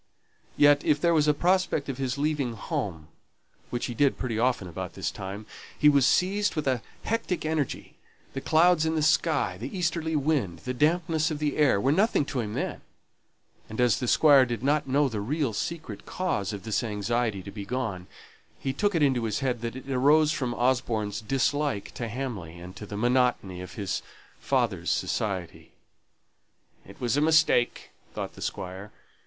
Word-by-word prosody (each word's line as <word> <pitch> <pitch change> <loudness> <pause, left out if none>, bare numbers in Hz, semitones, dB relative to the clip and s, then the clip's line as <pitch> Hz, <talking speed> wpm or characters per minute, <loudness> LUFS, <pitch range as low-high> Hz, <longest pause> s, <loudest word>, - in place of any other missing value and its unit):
Yet 145 0 +5
if 150 - +2
there 170 +2 +3
was 150 -2 +3
a 150 - +5
prospect 180 -3 +1
of 135 -2 -4
his 130 0 -2
leaving 145 -4 0
home, 85 -8 -4 0.6
which 120 - -2
he 120 - -4
did 140 +3 +2
pretty 115 -4 -2
often 120 -6 +1
about 85 - -6
this - - -3
time, 100 +2 -7 0.3
he 150 - +6
was 140 -3 +4
seized 195 -1 +2
with 155 - -2
a 130 -3 +1 0.2
hectic 215 -7 -2
energy: 155 -3 -2 0.4
the 135 - -4
clouds 160 +2 +4
in 160 0 0
the 155 - +1
sky, 155 - +2
the 130 - -5
easterly 160 -2 -1
wind, 140 - 0
the 125 - -2
dampness 160 +3 +1
of 155 - -3
the 150 -1 -1
air, 145 -9 +3
were 135 +7 +2
nothing 195 -2 +2
to 140 -2 -3
him 105 -3 -3
then; - - -3 0.9
and 110 - -7
as 125 -3 +3
the 125 - -2
Squire 140 0 +6
did 120 -2 -3
not 145 +1 +1
know 140 +2 +3
the 110 -5 -3
real 135 +2 -1
secret 165 +9 -5
cause 165 - -1
of 100 -2 -6
this 110 +2 -1
anxiety 110 -1 -1
to 100 - -8
be 100 0 -7
gone, 105 -6 -3 0.5
he 135 - -2
took 205 +6 0
it 160 - +3
into 130 -5 +2
his 110 +3 -2
head 125 -4 -1
that 115 0 -4
it 130 +1 -9
arose 145 +4 +4
from 125 -6 -2
Osborne's 120 -4 0
dislike 135 0 -1
to 120 - -4
Hamley 105 -9 -5
and 90 +2 -10
to 105 - -8
the 100 - -6
monotony 120 -6 +1
of 90 - -9
his 100 -4 -2 0.4
father's - - 0
society. 95 -5 -2 1.1
"It 100 - -14
was 125 0 0
a - - +3
mistake," 155 -6 +3 0.2
thought - - -4
the - - -13
Squire. 95 +3 -5
130 Hz, 180 wpm, -27 LUFS, 110-150 Hz, 1.1 s, he